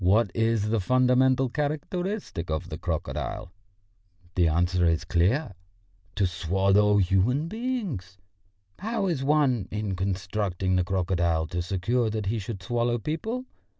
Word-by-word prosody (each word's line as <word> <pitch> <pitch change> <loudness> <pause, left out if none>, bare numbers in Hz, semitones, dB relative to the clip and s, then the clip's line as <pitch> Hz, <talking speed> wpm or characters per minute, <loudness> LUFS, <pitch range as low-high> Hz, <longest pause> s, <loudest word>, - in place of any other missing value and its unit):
What 100 +2 +4
is 115 -2 +1
the 115 0 +1
fundamental 130 +4 +3
characteristic 155 - -3
of 80 0 -2
the - - -5
crocodile? 70 +5 -3 0.8
The 90 -3 +3
answer 90 +3 +2
is 80 -1 +1
clear: 100 - +1 0.6
to 100 - +2
swallow 95 +4 +2
human 100 - +2
beings. 200 - -4 0.6
How 220 +1 -1
is 165 -8 -1
one, 135 -8 +2
in 105 -2 -2
constructing 95 0 -1
the 90 - +3
crocodile, 85 -3 0
to 90 - -2
secure 110 +7 0
that 110 -1 -3
he 110 +3 -1
should 100 -2 -6
swallow 120 +3 0
people? 220 - -3
105 Hz, 130 wpm, -27 LUFS, 90-130 Hz, 0.8 s, What